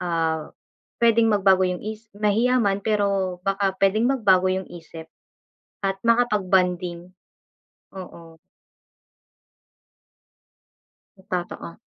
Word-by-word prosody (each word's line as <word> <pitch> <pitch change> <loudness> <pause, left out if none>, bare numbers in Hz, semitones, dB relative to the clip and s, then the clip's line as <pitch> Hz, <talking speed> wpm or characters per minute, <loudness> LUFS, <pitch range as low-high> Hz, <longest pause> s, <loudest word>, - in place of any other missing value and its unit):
ah, 165 -2 -2 0.5
puwedeng 230 -1 +4
magbago 195 -3 +3
yung 180 -1 -4
isi 220 +1 -7
mahiya 220 +5 +2
man 200 -1 +1
pero 200 -3 0
baka 195 0 0
puwedeng 210 +5 +2
magbago 200 -9 +3
yung 190 0 -1
isip 165 -1 -10 0.8
at 195 0 -1
makapag-bonding. 185 -6 +1 0.8
Oo. 170 -3 -11 2.8
M 190 - -20
totoo. 175 -1 -5
195 Hz, 90 wpm, -23 LUFS, 180-210 Hz, 2.8 s, puwedeng